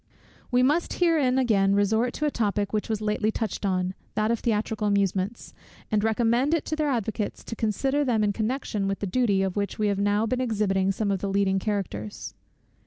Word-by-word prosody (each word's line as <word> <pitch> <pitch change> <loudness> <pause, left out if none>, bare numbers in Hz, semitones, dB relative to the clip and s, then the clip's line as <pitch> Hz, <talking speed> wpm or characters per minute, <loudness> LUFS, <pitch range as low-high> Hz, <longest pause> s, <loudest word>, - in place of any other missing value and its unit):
We 250 0 +3
must 300 +6 +2
here 335 -3 +2
again 240 -7 +3
resort 220 +4 +2
to 300 - -2
a 295 - +1
topic 205 -3 -1
which 210 +1 -1
was 220 -1 -1
lately 210 0 0
touched 220 -2 -3
on, 185 -1 0 0.2
that 215 +1 +1
of 235 - 0
theatrical 215 -1 -1
amusements; 200 +1 -1 0.4
and 210 -1 +2
recommend 235 +6 +2
it 325 - -2
to 310 - -2
their 305 -1 0
advocates 220 -4 -2
to 230 - -6
consider 265 +7 0
them 235 -5 +1
in 205 -1 +1
connection 215 -2 -2
with 195 0 -1
the - - -4
duty, 200 -1 +1
of 190 -1 -2
which 200 -1 -2
we 210 -1 +1
have 200 -1 -1
now 205 +2 +2
been 255 +3 -1
exhibiting 200 -5 +1
some 200 +1 -1
of 195 - 0
the 200 - -3
leading 195 -1 +2
characters. 190 - -4
215 Hz, 200 wpm, -26 LUFS, 200-240 Hz, 0.4 s, We